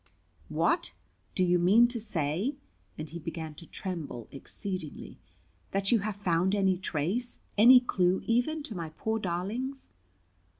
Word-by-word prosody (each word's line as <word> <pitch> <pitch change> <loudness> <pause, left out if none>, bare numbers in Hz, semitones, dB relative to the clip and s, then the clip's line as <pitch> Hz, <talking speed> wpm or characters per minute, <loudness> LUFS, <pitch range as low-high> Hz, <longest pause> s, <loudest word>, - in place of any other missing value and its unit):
"What! - - +1 0.4
do 185 - +2
you 180 0 +3
mean 205 +7 +6
to 240 -1 -3
say" 195 - -1 0.4
and 155 - -5
he 170 +3 -7
began 160 -1 -5
to 165 +2 -11
tremble 160 - -5
exceedingly 175 +3 -5 0.5
"that 195 0 0
you 235 - +5
have 210 0 -3
found 190 0 +1
any 190 -3 +2
trace, 190 - -2 0.2
any 245 +5 +9
clue 185 -7 +1
even, 245 +7 +1
to 230 - -6
my 170 -4 -4
poor 220 +8 -2
darlings?" 215 +9 -3
190 Hz, 140 wpm, -30 LUFS, 170-225 Hz, 0.5 s, any